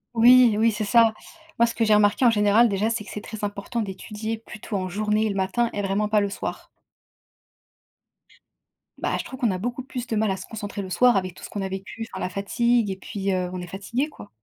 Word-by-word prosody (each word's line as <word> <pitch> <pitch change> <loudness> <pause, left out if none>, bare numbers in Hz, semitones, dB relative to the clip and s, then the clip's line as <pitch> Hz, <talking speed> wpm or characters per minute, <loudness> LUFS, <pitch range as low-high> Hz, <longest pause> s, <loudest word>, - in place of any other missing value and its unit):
Oui! 240 0 +7
Oui, 225 +1 +4
c'est 215 +1 -3
ça! 225 +1 +5 0.4
Moi, 235 - +5
ce 235 - -2
que 230 - 0
j'ai 215 -1 +5
remarqué 205 +4 +3
en - - +8
général, 215 +2 +4
déjà, 205 +2 0
c'est 230 -2 -2
que - - -13
c'est 210 - -5
très 220 -2 -8
important 205 +3 -3
d'étudier 215 +2 -5
plutôt 215 -1 -8
en 185 -1 -2
journée, 210 +3 0
et - - 0
le 200 - -3
matin, 195 +5 0
et 205 - -2
vraiment 200 +2 0
pas 210 0 +3
le 200 - 0
soir. 195 - -5 2.3
Bah, - - -1
je - - -3
trouve 260 - -9
qu'on 240 - +2
a 185 - -2
beaucoup 240 +6 -3
plus 250 -2 -6
de 235 - -3
mal 215 0 +1
à 190 - -1
se - - -8
concentrer 205 -2 -6
le 190 - -7
soir, 245 +5 +4
avec 185 -2 -2
tout - - -15
ce - - -7
qu'on 205 - -4
a 190 - -3
vécu 195 +4 -6
Enfin, - - -5
la - - -1
fatigue 225 +2 +1
et - - -3
puis, 195 0 -3
heu, 180 -1 -1
on 185 - -5
est 180 - -7
fatigué, 205 - -2
quoi. 295 -8 -12
210 Hz, 245 wpm, -24 LUFS, 195-230 Hz, 2.3 s, en